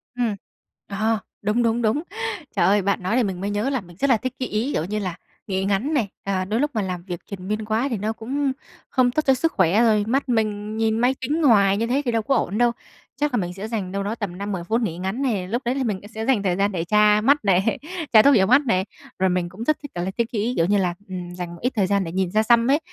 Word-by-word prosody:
Ừm, 235 -4 0 0.5
ờ, 215 +2 0 0.2
đúng, 210 +4 +1
đúng, 230 +1 +1
đúng. 225 +6 +1 0.5
Trời - - +3
ơi, 200 +1 +4
bạn 200 -1 -1
nói 185 +5 0
thì 250 - +3
mình 190 -4 -3
mới 200 - -2
nhớ 205 +5 -1
là 265 -5 -1
mình 175 -2 -16
rất 280 +7 +1
là 245 - +5
thích 255 +3 -4
cái 255 - -2
ý, 225 +7 -1
kiểu 155 - 0
như 210 +4 -2
là, 185 -4 -3 0.3
nghỉ 190 -1 -1
ngắn 205 +10 0
này, 240 -8 +1 0.2
ờ, 190 -2 -1
đôi 215 +4 -1
lúc 295 +2 +1
mà 220 - 0
làm 180 -2 -4
việc 175 -2 -6
triền 190 -2 -8
miên 215 +1 -2
quá 225 +5 0
thì 235 - -2
nó 215 +3 -2
cũng 270 +5 -2 0.4
không 255 -2 +2
tốt 310 - +1
cho 270 - +5
sức 325 +5 0
khỏe, 190 +3 +3
rồi 215 -3 +3
mắt 270 +3 0
mình 215 -2 -1
nhìn 220 0 +1
máy 250 +3 +3
tính 300 +5 -1
hoài 200 -6 +5
như 230 +2 0
thế 265 +4 +1
thì 240 - +1
đâu 225 -1 +1
có 270 +6 +1
ổn 205 - 0
đâu. 240 0 +4 0.5
Chắc 295 -2 +1
là 245 - +2
mình 175 -3 -2
sẽ 195 +3 -6
dành 210 -5 -3
đâu 200 +1 -2
đó 205 +3 -2
tầm 200 -6 -5
5-10 200 -3 -4
phút 225 +6 0
nghỉ 170 -7 -2
ngắn 190 +8 -3
này, 215 -9 -1
lúc 235 +6 -2
đấy 245 +2 0
thì 270 - -1
mình, 210 -6 -1
a, 205 - -11
sẽ 220 +1 -5
dành 235 -6 +2
thời 180 -2 +1
gian 200 +1 +1
để 175 -4 -2
tra 210 +3 +4
mắt 280 +2 +3
này, 195 +3 +2 0.4
tra 215 - +9
thuốc 280 +3 +6
nhỏ 190 -4 +5
mắt 255 +7 +5
này, 190 -5 +1 0.3
rồi 190 0 +3
mình 180 -1 -1
cũng 190 +6 -8
rất 305 +5 +1
thích 290 - -8
kiểu 175 - -2
là 190 - -2
cái 235 - +2
ý, 230 +2 -1
kiểu 165 - +3
như 205 +2 +2
là, 180 -3 +1 0.2
ừm, 180 -1 -6
dành 175 -1 -6
một - - -14
ít 250 +2 0
thời 200 -4 +2
gian 200 0 +1
để 165 - -5
nhìn 185 0 -1
xa 215 +1 +3
xăm 235 +1 +4
ấy. 290 - +4
215 Hz, 290 wpm, -23 LUFS, 190-240 Hz, 0.5 s, tra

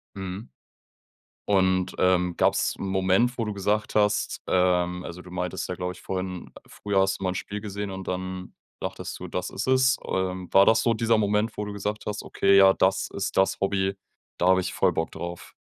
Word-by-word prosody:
Mhm. 95 +4 -6 1.0
Und, 95 -2 +2
ähm, 90 -1 +2
gab's - - +2
'n - - -4
Moment, 95 +6 +2
wo 115 - -1
du 105 - -3
gesagt 105 +2 -1
hast, 105 -1 +1
ähm 90 -1 +1
also 90 +1 -8
du 90 - -13
meintest 90 +1 -3
ja, 90 - -2
glaube 90 0 -3
ich, 90 - -15
vorhin: 95 -1 -5 0.2
Früher 100 -2 0
hast 95 0 0
du - - -6
mal 95 - +1
'n - - -6
Spiel 105 +2 -5
gesehen 100 -1 -5
und 95 0 -7
dann 95 0 -5 0.2
dachtest - - -5
du, - - -6
„das 90 +1 -3
ist - - -4
es.“ 130 0 +4
Ähm, 95 -1 -2
war 95 0 +7
das 110 0 +4
so 115 - +2
dieser 115 0 +2
Moment, 105 +1 +1
wo 105 - -2
du 105 - -6
gesagt 105 +1 -4
hast: 105 0 -4
„Okay, 100 0 +2
ja, 95 0 +7
das 95 +1 +1
ist 100 0 -3
das 95 - +2
Hobby, 95 0 0 0.4
da 90 - +1
habe 95 0 +5
ich 95 - -4
voll 90 -3 +2
Bock 80 - -2
drauf“? 85 0 -7
95 Hz, 205 wpm, -26 LUFS, 90-105 Hz, 1.0 s, war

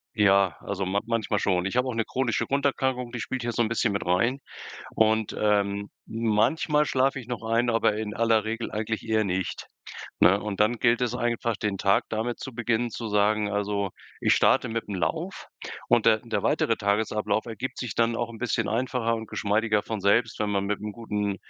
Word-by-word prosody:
Ja, 100 -4 +4
also, 100 -1 -3
man 100 +2 0
manchmal 110 -3 0
schon. 90 -1 +1
Ich 100 - -2
hab 125 +1 +2
auch 125 -3 -3
ne 115 -1 0
chronische 130 -3 -1
Grunderkrankung, 130 -3 0
die 125 - -5
spielt 130 +2 -3
hier 120 0 -2
so 120 - +1
'n - - 0
bisschen 115 -2 0
mit 100 - -2
rein. 115 +10 +1 0.6
Und, 110 -1 +2
ähm, 100 -1 +1 0.2
manchmal 115 +8 +1
schlafe 130 +1 +1
ich 120 - -11
noch 120 -2 -5
ein, 115 +2 +1
aber 115 -2 +2
in 105 -1 -4
aller 115 -2 +3
Regel 115 +1 -4
eigentlich 110 +1 -3
eher 110 -1 +2
nicht. 95 -1 -3 0.5
Ne, 95 +2 +6
und 105 -1 -5
dann 110 +3 +4
gilt 115 +1 +3
es 125 -1 0
einfach, 120 -2 -1
den 100 -3 -2
Tag 100 -1 +3
damit 115 +2 -2
zu 130 - -7
beginnen, 120 0 0
zu 115 0 -5
sagen 105 0 +2
also: 100 -1 -1 0.3
„Ich - - +4
starte - - +3
mit'm 110 -2 -4
Lauf“ 90 -4 -3 0.4
und - - +4
der - - +5
der - - -3
weitere - - +1
Tagesablauf 105 +1 0
ergibt 120 +4 -5
sich 125 -5 -4
dann 115 0 +2
auch 120 0 -2
'n 115 - -9
bisschen 120 -2 -1
einfacher 115 0 0
und 110 -1 -6
geschmeidiger 105 0 +1
von 110 -2 -4
selbst, 115 +3 +2
wenn 105 -1 -1
man 100 -1 0
mit 105 0 -2
'n 105 -1 -4
guten 105 -3 -2
110 Hz, 200 wpm, -26 LUFS, 105-120 Hz, 0.6 s, Ne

